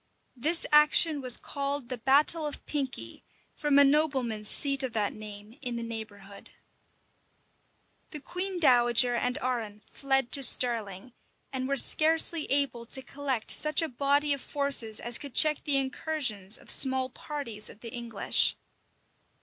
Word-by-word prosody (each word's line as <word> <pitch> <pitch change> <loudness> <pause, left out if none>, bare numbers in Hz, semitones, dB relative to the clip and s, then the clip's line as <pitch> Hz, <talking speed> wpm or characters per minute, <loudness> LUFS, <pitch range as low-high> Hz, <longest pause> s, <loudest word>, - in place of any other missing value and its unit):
This 315 +7 -1
action 300 0 +4
was 255 -2 0
called 280 -2 -5
the 255 - -5
battle 295 +5 +4
of 295 - -9
Pinkey, 275 -3 -6 0.3
from 295 -2 0
a 285 - +7
nobleman's 265 -7 0
seat 275 -1 +2
of 260 -3 +1
that 210 -2 -2
name 215 +3 -12
in 245 -3 -5
the 235 - -5
neighborhood. 205 -3 -10 1.6
The 300 - -8
queen 365 +5 -5
dowager 245 -4 +3
and 250 +1 -2
Arran 225 -5 -4
fled 270 -2 -1
to 280 - +5
Stirling, 230 -4 0 0.4
and 260 -1 -4
were 275 0 -2
scarcely 320 +3 +2
able 270 -4 -1
to 265 +2 -4
collect 265 -3 -3
such 305 +2 +2
a - - -2
body 285 +3 0
of 280 - -5
forces 275 -7 0
as 240 0 +2
could 285 -3 -10
check 305 -1 +4
the 285 -2 +3
incursions 265 -7 -3
of - - -1
small 260 -1 +3
parties 250 -7 -7
of 210 - -14
the 230 -2 -10
English. 235 -4 +2
265 Hz, 150 wpm, -27 LUFS, 235-285 Hz, 1.6 s, a